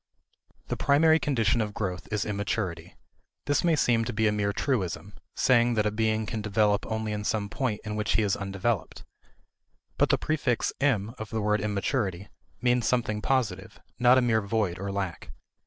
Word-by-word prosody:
The -, -, -1 dB
primary 160 Hz, +3 st, +4 dB
condition 115 Hz, -6 st, +1 dB
of 105 Hz, -1 st, -4 dB
growth 90 Hz, -4 st, -3 dB
is 105 Hz, -1 st, -1 dB
immaturity. 100 Hz, -4 st, -3 dB, 0.5 s
This 145 Hz, -1 st, +1 dB
may 170 Hz, -2 st, +3 dB
seem 120 Hz, -5 st, +2 dB
to 120 Hz, -, -3 dB
be 110 Hz, +1 st, +1 dB
a 105 Hz, -, +4 dB
mere 105 Hz, -1 st, 0 dB
truism 100 Hz, -4 st, -2 dB, 0.2 s
saying 120 Hz, -2 st, +3 dB
that 105 Hz, -1 st, +1 dB
a 105 Hz, -, +1 dB
being 110 Hz, 0 st, 0 dB
can 110 Hz, 0 st, -4 dB
develop 105 Hz, 0 st, +1 dB
only 110 Hz, -1 st, -2 dB
in 105 Hz, 0 st, -3 dB
some 105 Hz, -1 st, -1 dB
point 115 Hz, -2 st, -2 dB
in 105 Hz, 0 st, -4 dB
which 105 Hz, -1 st, 0 dB
he 110 Hz, -, +2 dB
is 100 Hz, -2 st, +1 dB
undeveloped. 100 Hz, +2 st, -3 dB, 1.0 s
But -, -, +4 dB
the -, -, +4 dB
prefix 145 Hz, -7 st, 0 dB
"im" 115 Hz, -6 st, +1 dB
of 110 Hz, -1 st, -6 dB
the 110 Hz, -, -2 dB
word 105 Hz, -1 st, +1 dB
immaturity 100 Hz, -2 st, -2 dB, 0.3 s
means 120 Hz, -2 st, +2 dB
something 110 Hz, -3 st, 0 dB
positive, 110 Hz, -6 st, -1 dB, 0.2 s
not 125 Hz, +1 st, +6 dB
a 130 Hz, -, +3 dB
mere 110 Hz, -2 st, +2 dB
void 100 Hz, -4 st, -1 dB
or 100 Hz, +1 st, -3 dB
lack. 95 Hz, -3 st, -4 dB
110 Hz, 180 wpm, -27 LUFS, 100-120 Hz, 1.0 s, not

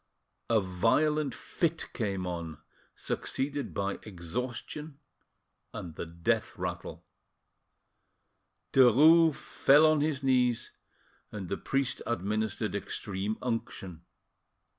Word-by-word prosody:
A 115 Hz, -1 st, +4 dB
violent 125 Hz, +10 st, +1 dB
fit 165 Hz, -1 st, -2 dB
came 100 Hz, -5 st, -2 dB
on, 85 Hz, -3 st, -4 dB, 0.4 s
succeeded 140 Hz, +1 st, -2 dB
by 100 Hz, 0 st, -2 dB
exhaustion 125 Hz, -, -5 dB, 0.8 s
and 85 Hz, -3 st, -6 dB
the 80 Hz, -, -6 dB
death 85 Hz, 0 st, -1 dB
rattle. -, -, -5 dB, 1.7 s
Derues 150 Hz, +6 st, +7 dB
fell 145 Hz, +3 st, +4 dB
on 155 Hz, -1 st, +4 dB
his 145 Hz, -3 st, -1 dB
knees, 125 Hz, -3 st, +2 dB, 0.6 s
and 100 Hz, -4 st, -6 dB
the 100 Hz, -, -1 dB
priest 135 Hz, -1 st, -1 dB
administered 105 Hz, 0 st, -1 dB
extreme 100 Hz, +1 st, -3 dB
unction. 115 Hz, -8 st, -4 dB
115 Hz, 95 wpm, -30 LUFS, 95-140 Hz, 1.7 s, Derues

